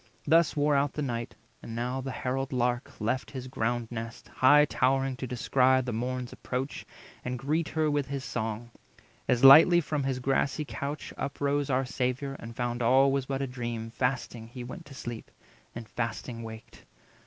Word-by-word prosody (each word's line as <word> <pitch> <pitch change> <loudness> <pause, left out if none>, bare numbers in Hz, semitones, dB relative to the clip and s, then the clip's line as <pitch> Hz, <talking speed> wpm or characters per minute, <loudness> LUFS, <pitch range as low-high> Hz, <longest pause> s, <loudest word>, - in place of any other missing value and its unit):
Thus 165 +1 +4
wore 145 0 +3
out 140 +1 +1
night; 120 -5 -3 0.3
and 115 - -7
now 125 +3 -2
the 135 - -5
harald 130 +1 -2
Lark 125 -1 -1
Left 115 +5 -1
his 130 -2 -6
ground 120 -2 -1
nest, 115 0 -7
high 145 +3 +6
towering 135 -1 +1
to 130 - -4
descry 125 +2 -6 0.2
280 130 - -3
The 125 - -3
Morn's 125 +2 -3
approach, 130 +3 -4 0.4
and 125 0 -3
greet 150 +6 -1
her 155 -1 +1
with 145 -2 0
his 140 -1 -4
song. 110 +2 -4 0.6
As 120 +1 +2
lightly 160 +6 +10
from 150 -3 -2
his 135 -1 -1
grassy 135 +3 0
couch 140 +1 -5
up 140 - -4
rose 145 0 0
Our 130 0 +1
Saviour, 130 +3 -2
and 115 0 -9
found 120 0 -2
all 130 +3 +5
was 135 -1 -1
but 135 0 -2
a - - -2
dream; 120 -3 -5
Fasting 125 -2 -2
he 120 +1 -8
went 165 +8 -9
to 135 - -11
sleep, 120 -3 -7 0.5
and 115 -1 -7
fasting 115 +1 -4
waked. 110 -1 -10
130 Hz, 180 wpm, -29 LUFS, 120-140 Hz, 0.6 s, lightly